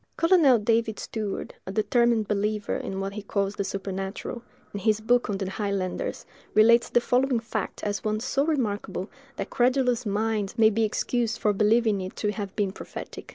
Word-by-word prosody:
Colonel 330 -7 +5
David 225 0 +1
Steward, 215 -3 -4
a - - -3
determined 225 +1 +2
believer 210 0 -1
in 190 - -4
what 195 0 -3
he 210 - -5
calls 200 -1 -1
the 200 - 0
supernatural, 195 +4 -4 0.3
in 205 - -3
his 215 +1 +2
book 240 +2 +2
on 200 - -1
the 195 -1 -3
highlanders, 195 -2 -3 0.3
relates 230 +2 +6
the - - +4
following 250 +1 +2
fact 220 -3 -4
as 205 -1 -2
one 215 0 0
so 270 +4 0
remarkable, 210 - -2 0.2
that - - -5
"credulous 250 -1 +2
minds" 215 0 -1
may 220 -1 +6
be 220 +1 +2
excused 235 +2 -1
for 210 - +1
believing 215 0 +3
it 185 0 -6
to 210 - -1
have 205 -2 -6
been 200 -3 0
prophetic. - - -9
215 Hz, 175 wpm, -26 LUFS, 200-235 Hz, 0.3 s, relates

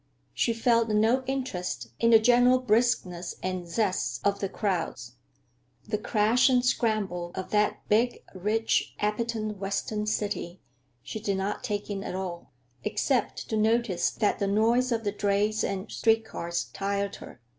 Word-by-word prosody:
She 235 - +1
felt 230 0 +2
no 220 +5 +3
interest 180 - -3
in 230 - +3
the 230 - +9
general 245 +3 +5
briskness 215 -7 0
and 185 -1 -3
zest 175 - -1
of 200 0 +2
the 195 - -2
crowds. 175 - -2 0.7
The 210 -1 -1
crash 220 +4 +3
and 250 -1 +3
scramble 200 -8 0
of 185 -1 -5
that 210 0 +1
big, 235 +4 +2
rich, 210 +4 0
appetent 215 0 -2
Western 200 +2 -2
city 205 -4 -2 0.4
she 220 - -6
did 200 -2 -1
not 195 +5 -2
take 210 -4 -3
in 195 -1 -4
at 180 - -5
all, 180 -5 -5 0.3
except 255 -4 -1
to 220 - -1
notice 220 -4 +2
that 210 - 0
the 200 - 0
noise 230 +5 +2
of 230 -1 0
the 205 - 0
drays 205 +1 +1
and 195 0 -3
street 225 0 +2
cars 170 -4 -3
tired 200 0 -2
her. - - -12
210 Hz, 155 wpm, -27 LUFS, 195-230 Hz, 0.7 s, the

